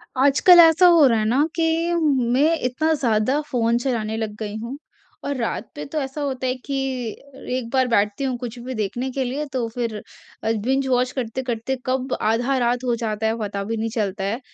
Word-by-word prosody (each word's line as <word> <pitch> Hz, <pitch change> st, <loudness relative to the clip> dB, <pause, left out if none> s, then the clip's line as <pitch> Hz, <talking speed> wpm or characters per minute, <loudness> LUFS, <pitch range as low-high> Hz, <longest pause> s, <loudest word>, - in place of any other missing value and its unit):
आजकल 280 Hz, +7 st, +6 dB
ऐसा 330 Hz, +2 st, +7 dB
हो 335 Hz, -4 st, +7 dB
रहा 230 Hz, -3 st, +2 dB
है 215 Hz, -, 0 dB
ना 255 Hz, +7 st, +3 dB
कि 330 Hz, +1 st, +1 dB
मैं 280 Hz, -1 st, +2 dB
इतना 290 Hz, +6 st, 0 dB
ज़्यादा 250 Hz, -1 st, +1 dB
फ़ोन 235 Hz, -1 st, +2 dB
चलाने 230 Hz, -4 st, -2 dB
लग 220 Hz, -2 st, -4 dB
गई 210 Hz, -1 st, -4 dB
हूँ, 235 Hz, +5 st, -6 dB, 0.5 s
और 285 Hz, 0 st, -2 dB
रात 230 Hz, -2 st, -3 dB
पे 150 Hz, -, -6 dB
तो 310 Hz, -, -3 dB
ऐसा 270 Hz, +2 st, -5 dB
होता 265 Hz, -2 st, -2 dB
है 255 Hz, -, 0 dB
कि 275 Hz, -1 st, -2 dB, 0.8 s
एक 240 Hz, -3 st, -5 dB
बार 260 Hz, -1 st, +3 dB
बैठती 210 Hz, +1 st, +1 dB
हूँ 260 Hz, -2 st, -1 dB
कुछ 245 Hz, 0 st, -7 dB
भी 255 Hz, +2 st, -6 dB
देखने 220 Hz, +5 st, -2 dB
के 265 Hz, +1 st, -1 dB
लिए, 270 Hz, +4 st, -3 dB
तो 255 Hz, -4 st, -3 dB
फिर 230 Hz, -4 st, -3 dB, 0.4 s
बिंज-वॉच 250 Hz, +3 st, +1 dB
करते-करते 250 Hz, 0 st, -3 dB
कब 255 Hz, 0 st, -1 dB
आधा 240 Hz, +5 st, +1 dB
रात 245 Hz, 0 st, 0 dB
हो 240 Hz, -1 st, +1 dB
जाता 220 Hz, -2 st, -2 dB
है, 225 Hz, +1 st, -1 dB
पता 200 Hz, -2 st, -3 dB
भी 225 Hz, +3 st, -3 dB
नहीं 225 Hz, +1 st, -2 dB
चलता 200 Hz, -3 st, -2 dB
है। 205 Hz, +5 st, -2 dB
250 Hz, 195 wpm, -22 LUFS, 225-270 Hz, 0.8 s, ऐसा